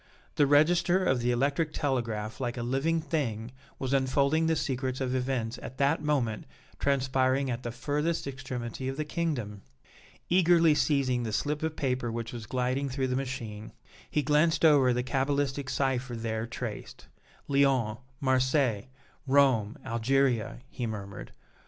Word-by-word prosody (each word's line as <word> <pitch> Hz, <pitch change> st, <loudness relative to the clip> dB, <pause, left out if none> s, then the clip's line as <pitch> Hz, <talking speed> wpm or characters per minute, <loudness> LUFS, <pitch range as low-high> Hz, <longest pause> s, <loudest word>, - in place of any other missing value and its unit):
The 145 Hz, -, +3 dB
register 175 Hz, +5 st, +4 dB
of 130 Hz, -6 st, +2 dB
the 120 Hz, +1 st, 0 dB
electric 140 Hz, +5 st, +1 dB
telegraph 115 Hz, -5 st, -2 dB
like 120 Hz, -1 st, -2 dB
a 120 Hz, -, -3 dB
living 140 Hz, +7 st, 0 dB
thing 125 Hz, -8 st, -2 dB, 0.3 s
was 135 Hz, 0 st, -2 dB
unfolding 140 Hz, +4 st, +2 dB
the 160 Hz, -, +2 dB
secrets 130 Hz, -3 st, -2 dB
of 130 Hz, -1 st, -1 dB
events 125 Hz, -2 st, -2 dB
at 130 Hz, -, -8 dB
that 140 Hz, +3 st, +2 dB
moment 135 Hz, -8 st, -1 dB, 0.3 s
transpiring 130 Hz, -1 st, +1 dB
at 120 Hz, 0 st, -3 dB
the 120 Hz, -, -4 dB
furthest 150 Hz, +7 st, -1 dB
extremity 130 Hz, -2 st, -5 dB
of 135 Hz, +1 st, -3 dB
the 155 Hz, -, -2 dB
Kingdom! 140 Hz, -, -3 dB, 0.7 s
Eagerly 170 Hz, -3 st, +5 dB
seizing 135 Hz, -4 st, +1 dB
the 115 Hz, -2 st, -3 dB
slip 150 Hz, +7 st, -1 dB
of 160 Hz, 0 st, -2 dB
paper 125 Hz, -3 st, -1 dB
which 115 Hz, 0 st, -4 dB
was 115 Hz, -2 st, -7 dB
gliding 130 Hz, +2 st, -1 dB
through 130 Hz, 0 st, -1 dB
the 125 Hz, -, 0 dB
machine, 120 Hz, -5 st, -5 dB, 0.4 s
he 150 Hz, -, 0 dB
glanced 155 Hz, +3 st, +3 dB
over 140 Hz, -5 st, +6 dB
the 125 Hz, 0 st, 0 dB
cabalistic 135 Hz, +1 st, -1 dB
cipher 130 Hz, -1 st, -1 dB
there 110 Hz, 0 st, -3 dB
traced. 115 Hz, -2 st, -7 dB, 0.4 s
"Lyons 135 Hz, -6 st, +2 dB, 0.2 s
Marseilles 130 Hz, -4 st, +2 dB, 0.4 s
Rome 130 Hz, -6 st, +3 dB
Algeria," 120 Hz, 0 st, +1 dB
he 120 Hz, -, -3 dB
murmured. 100 Hz, -2 st, -7 dB
130 Hz, 145 wpm, -29 LUFS, 120-145 Hz, 0.7 s, over